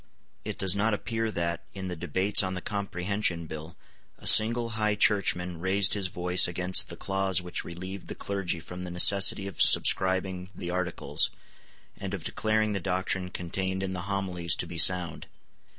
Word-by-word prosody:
It - - -6
does 95 0 +2
not 105 +2 0
appear 115 +1 -4
that, 85 -4 -4
in 95 -1 -6
the 90 - -5
debates 95 +4 +4
on 95 -1 -3
the - - -4
Comprehension 100 -3 -3
Bill, 80 +1 -9 0.4
a - - -16
single 115 +2 +6
High 110 -1 -1
Churchman 90 -4 0
raised 95 +2 +2
his 100 -3 -1
voice 90 0 +3
against 90 +1 0
the - - -9
clause 95 -1 0
which 90 0 -6
relieved 95 +3 -9
the - - -8
clergy 95 -4 -4
from 90 +3 -9
the 90 - -7
necessity 95 +3 +5
of 100 -5 -5
subscribing 95 0 +2
the 85 0 -6
Articles, 90 -1 -1 0.7
and 100 0 -6
of 90 - -10
declaring 110 +2 -1
the 100 - -3
doctrine 95 0 -3
contained 95 +2 -4
in 95 0 -4
the 90 +1 -7
Homilies 90 -4 -1
to - - -3
be 85 - -4
sound. 90 0 +3
95 Hz, 170 wpm, -27 LUFS, 90-100 Hz, 0.7 s, single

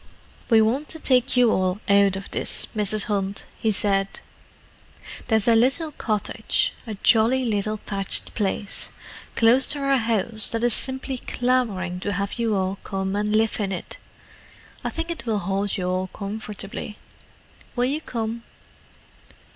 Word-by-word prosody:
"We 225 -2 +6
want 260 +7 0
to 320 - -4
take 255 -2 +3
you 245 -2 +5
all 185 +1 0
out 200 -1 +4
of 195 +1 -7
this, - - -1
Mrs. 210 0 +2
Hunt," 200 -1 -2
he 220 - +1
said. 195 -1 +2 1.2
"There's 220 -2 +2
a 230 - +6
little 270 +7 +2
cottage—a 220 -1 -2
jolly 245 +3 +4
little 215 -1 -1
thatched 195 -2 -1
place—close 225 +4 0
to 290 - +1
our 275 -1 +2
house 225 -2 -1
that 230 0 -1
is 240 -1 +4
simply 260 0 +2
clamouring 225 -10 -1
to 205 +2 -2
have 200 +4 -3
you 225 -2 +1
all 190 0 -1
come 190 0 -3
and 210 +1 0
live 220 0 +1
in 200 -2 -1
it. 180 - -6 0.8
I - - -1
think 330 +1 -4
it 320 -7 -6
will 220 -2 +1
hold 195 +1 -1
you 180 -1 -2
all 185 +1 -1
comfortably. 205 +1 -6 0.8
Will 245 0 +2
you 285 +4 -1
come?" 230 -4 -4
215 Hz, 145 wpm, -24 LUFS, 200-245 Hz, 1.2 s, We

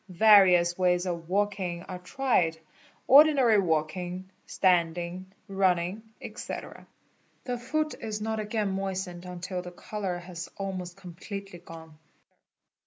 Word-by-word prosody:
'Various 180 -3 +5
ways 180 0 +2
of 170 -2 -4
walking 190 -3 -1
are 185 -1 -7
tried, 180 - 0 0.5
ordinary 270 -6 +6
walking, 180 +2 -2 0.2
standing, 175 0 0 0.2
running, 190 0 +1 0.2
etc. - - -8 0.6
The 245 -2 -3
foot 305 +5 -1
is 215 -2 -4
not 220 +1 -2
again 210 -1 -1
moistened 190 -2 -4
until 180 0 -5
the 180 - -8
colour 190 0 -5
has 175 -1 -8
almost 185 -2 -5
com 180 -3 -10
pletely 195 0 -8
gone. 160 -2 -12
185 Hz, 115 wpm, -28 LUFS, 175-205 Hz, 0.6 s, ordinary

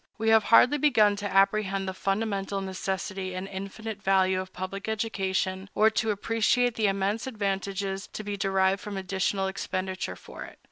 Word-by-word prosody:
We 225 0 0
have 220 -1 +5
hardly 255 +5 +6
begun 220 -8 +4
to 205 -1 -4
apprehend 195 0 +2
the 190 - -2
fundamental 195 0 -1
necessity 190 0 -4
and 185 +1 -4
infinite 200 +2 -6
value 190 -1 +3
of 185 0 -9
public 195 +3 -5
education, 195 -3 -1
or 220 +1 +5
to 220 0 0
appreciate 225 +4 +1
the 220 -2 +1
immense 195 +4 -1
advantages 195 -3 -2
to 215 - -7
be 205 0 -3
derived 195 0 +1
from 210 -4 -6
additional 190 +1 -1
expenditure 190 -1 -3
for - - -10
it. - - -12
195 Hz, 160 wpm, -27 LUFS, 190-215 Hz, -, hardly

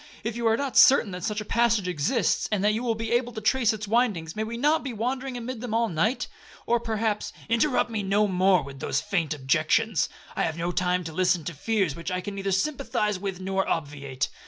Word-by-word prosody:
If 225 0 -3
you 235 -1 0
are 225 0 +3
not 280 -1 -2
certain 255 -6 +7
that 180 -1 -6
such 210 +2 -2
a - - -7
passage 230 -4 +2
exists, 180 - 0
and 205 -2 0
that 210 +1 +3
you 220 - -1
will 235 -2 0
be 225 +1 -4
able 240 0 +1
to 220 - -4
trace 225 +1 +2
its 215 -1 -5
windings, 205 -8 0
may 215 - -1
we 230 +2 -5
not 300 +5 +2
be 265 -3 -4
wandering 255 +3 -3
amid 240 0 -5
them 240 -3 -3
all 230 0 +2
night? 210 +10 0 0.4
Or 240 0 +2
perhaps—' 220 -2 -2 0.2
'Interrupt 240 +1 +2
me 220 -2 -1
no 200 +2 +2
more 185 0 +3
with 135 0 -10
those - - 0
faint 175 -7 -1
objections; 155 +9 +1 0.3
I - - -1
have 160 - -1
no 170 +1 -1
time 180 0 0
to 160 -1 -7
listen 180 -1 +2
to 170 - -5
fears 190 0 0
which 170 - -5
I 180 0 -1
can 200 +2 -6
neither 195 0 -3
sympathise 210 -2 0
with 190 -1 -5
or 195 0 0
obviate. 140 -4 -2
210 Hz, 230 wpm, -26 LUFS, 180-230 Hz, 0.4 s, certain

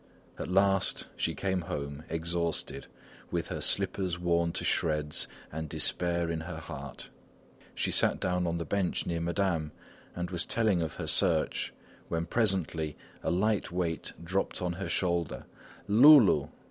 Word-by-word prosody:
At - - -4
last 95 +1 +2
she - - -1
came 95 -2 -1
home, 70 -2 -5
exhausted, 85 -4 -2 0.4
with - - -2
her - - -4
slippers 95 -2 +2
worn 85 -1 +1
to - - -3
shreds, 75 -2 +1 0.2
and 80 0 -5
despair 85 +2 +1
in 80 - -2
her 80 0 -6
heart. 70 -4 -8 0.6
She - - 0
sat - - +3
down 90 -1 0
on 85 0 -1
the 85 - -3
bench 95 +2 -1
near 85 -1 -2
Madame 85 -3 0 0.4
and 90 0 -4
was 90 -1 0
telling 110 -6 +2
of 80 -2 -3
her - - -5
search 85 -5 +1 0.4
when 85 0 -2
presently 85 -7 0 0.2
a - - -1
light 105 +2 +1
weight 90 -2 -2
dropped 95 +3 -1
on 90 -1 -1
her 95 +3 -5
shoulder 85 -4 -1 0.4
Loulou! 125 +2 +7
85 Hz, 145 wpm, -30 LUFS, 80-95 Hz, 0.6 s, Loulou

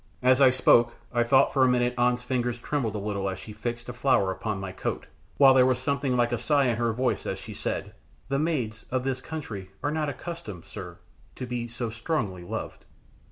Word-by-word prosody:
As 130 +2 +5
I 135 - +8
spoke 120 -2 +4 0.2
I 120 - +3
thought 130 +3 +4
for 135 - +4
a - - +6
minute 125 -1 +2
An's 125 0 +2
fingers 125 -1 -1
trembled 120 -4 -2
a - - -1
little 100 -1 -2
as 95 - -4
she 95 +3 -9
fixed 115 +2 -5
a 125 - -5
flower 125 -6 +2
upon 105 +1 -3
my 95 -1 -5
coat, 95 - -4 0.3
while 135 -2 +8
there 130 -1 +6
was 130 -2 +2
something 140 -1 0
like 120 0 +2
a 120 - 0
sigh 145 -3 +3
in 120 -3 +1
her 120 -1 +1
voice 120 -2 -1
as - - -2
she - - -9
said - - -4 0.3
"The 135 +1 0
maids 130 -9 -1
of 130 0 -1
this 130 -1 -2
country 110 -12 -6
are 145 - +1
not 155 -1 -1
accustomed, 140 - -7
sir, - - -8 0.4
to 125 - -5
be 120 -1 -3
so 120 0 -4
strongly 110 - -2
loved." 85 - -6
125 Hz, 215 wpm, -27 LUFS, 110-135 Hz, 0.4 s, I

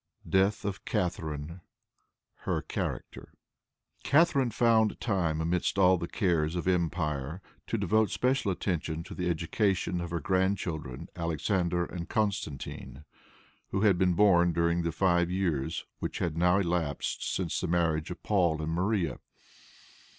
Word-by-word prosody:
Death 95 +2 +2
of 100 0 -3
Catharine. 85 - -3 0.8
Her - - -2
Character. - - -5 0.7
Catharine 140 -4 +4
found 110 -1 +3
time, 85 -8 0
amidst 85 +4 0
all 95 -2 +5
the 85 - -3
cares 85 -5 0
of 90 0 -3
empire, 80 -4 -1 0.3
to - - -1
devote 110 -1 +2
special 125 -5 +1
attention 85 -3 -2
to - - -9
the 90 -1 -2
education 90 +2 0
of 85 - -5
her 85 0 -2
grandchildren 90 -6 -1
Alexander 85 +1 0
and 85 -1 -7
Constantine, 85 -8 -3 0.6
who 95 - -1
had 100 -5 +4
been 90 -2 +3
born 90 -3 +5
during 85 +1 +1
the 85 0 -1
five 85 0 +2
years 90 -7 -1
which - - -4
had 85 -3 -1
now 90 +2 +3
elapsed 85 -6 -1
since 90 -4 -2
the 90 - -1
marriage 85 -1 +1
of 90 - -8
Paul 85 -6 +2
and 80 +1 -3
Maria. 90 -1 0
90 Hz, 135 wpm, -29 LUFS, 85-95 Hz, 0.8 s, all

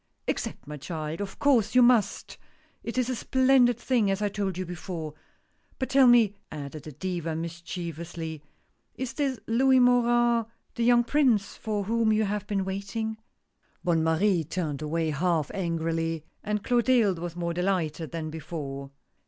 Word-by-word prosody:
"Accept, - - -3
my 150 +1 -7
child! 155 +2 -5
of 200 -1 -6
course 245 -6 +2
you 250 - +7
must 235 -5 +2 0.2
— - - -36
it 230 - -5
is 250 -2 +2
a 255 - -1
splendid 260 -1 +3
thing 240 -7 +1
as 195 0 0
I 210 -1 0
told 195 -3 -2
you 185 - -3
before. 170 -3 -6 0.6
But 260 - -3
tell 270 -1 +6
me," 235 -4 +6 0.2
added 145 0 -7
the 155 - -7
Diva 165 +1 -3
mischievously, 165 -1 -6 0.3
" - - -45
is 255 -2 -4
this 275 -4 -1
Louis 260 +3 +4
Morin, 240 -1 +4 0.2
— - - -44
the 235 - 0
young 240 0 +5
Prince 240 -7 +2
for 210 -2 -2
whom 225 +2 +1
you 215 0 +3
have 205 0 -2
been 195 -2 -1
waiting?" 200 +3 -3 0.7
Bonne 165 -2 +2
Marie 165 +2 +2
turned 155 -3 -3
away 160 +1 -1
half 160 0 0
angrily, 165 -2 -1 0.2
and 210 -1 -2
Clotilde 240 -6 +3
was 170 0 -5
more 170 -1 -2
delighted 175 -3 -1
than 160 -2 -5
before. 145 -4 -6
195 Hz, 165 wpm, -27 LUFS, 165-235 Hz, 0.7 s, you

